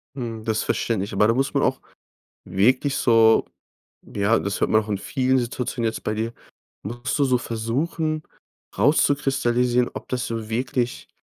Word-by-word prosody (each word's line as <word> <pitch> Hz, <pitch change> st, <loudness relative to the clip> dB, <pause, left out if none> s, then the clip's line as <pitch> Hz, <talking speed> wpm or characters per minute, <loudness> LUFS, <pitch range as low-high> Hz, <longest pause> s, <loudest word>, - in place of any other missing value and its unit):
Hm, 115 Hz, -4 st, -5 dB
das 110 Hz, -1 st, 0 dB
verständlich. 100 Hz, -4 st, -1 dB
Aber 105 Hz, +2 st, +4 dB
da 115 Hz, -, +3 dB
muss 135 Hz, +3 st, 0 dB
man -, -, +2 dB
auch -, -, 0 dB, 0.6 s
wirklich 130 Hz, +8 st, +2 dB
so 115 Hz, -2 st, +4 dB, 0.6 s
ja, 105 Hz, +3 st, +1 dB
das 100 Hz, 0 st, -3 dB
hört -, -, +2 dB
man 110 Hz, -, +5 dB
auch 105 Hz, -, -10 dB
in 100 Hz, -, 0 dB
vielen 130 Hz, +5 st, +1 dB
Situationen 120 Hz, -1 st, -3 dB
jetzt -, -, -7 dB
bei 105 Hz, -, -1 dB
dir, 110 Hz, +2 st, -3 dB, 0.5 s
musst 120 Hz, +7 st, -3 dB
du 140 Hz, -, +4 dB
so 130 Hz, -2 st, +3 dB
versuchen, 150 Hz, +8 st, -2 dB, 0.6 s
rauszukristallisieren, 125 Hz, -2 st, +2 dB
ob -, -, -8 dB
das 125 Hz, -1 st, -2 dB
so 115 Hz, -1 st, -4 dB
wirklich 125 Hz, +1 st, -2 dB
120 Hz, 160 wpm, -23 LUFS, 110-130 Hz, 0.6 s, man